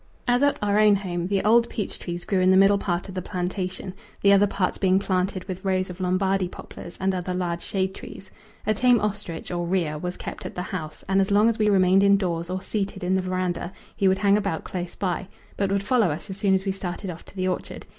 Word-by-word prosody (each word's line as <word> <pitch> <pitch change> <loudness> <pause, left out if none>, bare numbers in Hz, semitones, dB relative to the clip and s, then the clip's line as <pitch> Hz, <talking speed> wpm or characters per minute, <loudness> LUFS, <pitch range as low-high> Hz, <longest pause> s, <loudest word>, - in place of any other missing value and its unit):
As 245 +1 +3
at 285 0 +3
our 205 0 +2
own 210 -1 +6
home 175 -3 -3
the 195 0 0
old 230 +2 +4
peach 210 - -4
trees 175 0 -5
grew 195 - +1
in 185 0 +4
the 190 - +6
middle 195 +1 +5
part 175 -2 -2
of 190 - -8
the 185 - -3
plantation, 185 0 -4 0.3
the 200 0 +7
other 200 +1 +5
parts 190 -2 -1
being 190 -1 +3
planted 185 -1 -1
with 185 0 -7
rows 185 -1 0
of 180 - -11
Lombardy 185 +1 +1
poplars 175 -1 -10
and 190 0 +1
other 180 0 -3
large 175 -2 -2
shade 190 -1 -1
trees. 190 0 -11 0.3
A 215 - +3
tame 245 +2 +4
ostrich, 200 -6 -4
or 175 -1 -2
rhea, 170 -5 0
was 180 +2 -4
kept - - -7
at - - -7
the 180 - -3
house, 160 -5 -6
and 195 +1 +3
as 195 - 0
long 205 +2 +4
as 230 0 +1
we 210 -1 +3
remained 190 -1 +5
indoors 185 -4 +2
or 185 +1 -3
seated 195 -2 -3
in 180 +1 +1
the 190 - +2
verandah 185 -1 -2 0.2
he 195 - +2
would 190 0 +3
hang 200 0 +4
about 195 -6 -2
close 175 -1 -5
by, 185 -1 -2 0.3
but 195 -1 0
would 200 0 +1
follow 225 -3 +3
us 160 +6 -5
as 190 - -7
soon 195 -1 +3
as 190 +1 -1
we 195 - +1
started 190 0 -5
off 170 - -10
to - - -16
the 185 -1 -1
orchard. 185 - -4
190 Hz, 245 wpm, -25 LUFS, 180-200 Hz, 0.3 s, the